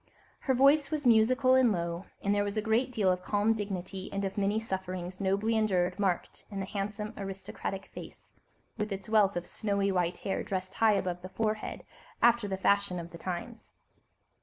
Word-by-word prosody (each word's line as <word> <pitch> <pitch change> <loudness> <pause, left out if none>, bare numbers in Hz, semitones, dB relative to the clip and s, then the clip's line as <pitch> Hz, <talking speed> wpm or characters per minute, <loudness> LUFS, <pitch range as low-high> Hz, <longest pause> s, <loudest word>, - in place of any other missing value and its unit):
Her 265 - +1
voice 275 +2 +5
was 300 -2 -2
musical 250 +3 +5
and 260 -3 +5
low, 170 -1 -3 0.2
and 200 - +2
there 205 0 +2
was 205 +1 -3
a - - +2
great 230 +4 +1
deal 205 -6 +2
of 180 0 -1
calm 205 +3 +2
dignity 195 -3 -4
and 195 0 -2
of 190 - -3
many 205 +1 +1
sufferings 185 -3 -4
nobly 200 +4 +1
endured 190 -4 +1
marked 190 -3 -1
in 200 -2 -5
the 195 - -2
handsome, 210 +2 -4
aristocratic 195 0 -5
face, - - -10 0.5
with 210 0 -2
its 195 +1 -5
wealth 205 -3 +4
of 175 - -3
snow 205 -2 -2 0.2
white 175 -1 0
hair 195 - -2
dressed 185 0 -3
high 225 -1 +4
above 180 -3 -1
the 185 - -8
forehead, 215 +1 -2 0.4
after 235 -2 +4
the 190 -1 -2
fashion 200 -1 +2
of 170 0 -6
the 170 - -10
times. 185 +7 -6
200 Hz, 185 wpm, -30 LUFS, 185-220 Hz, 0.5 s, voice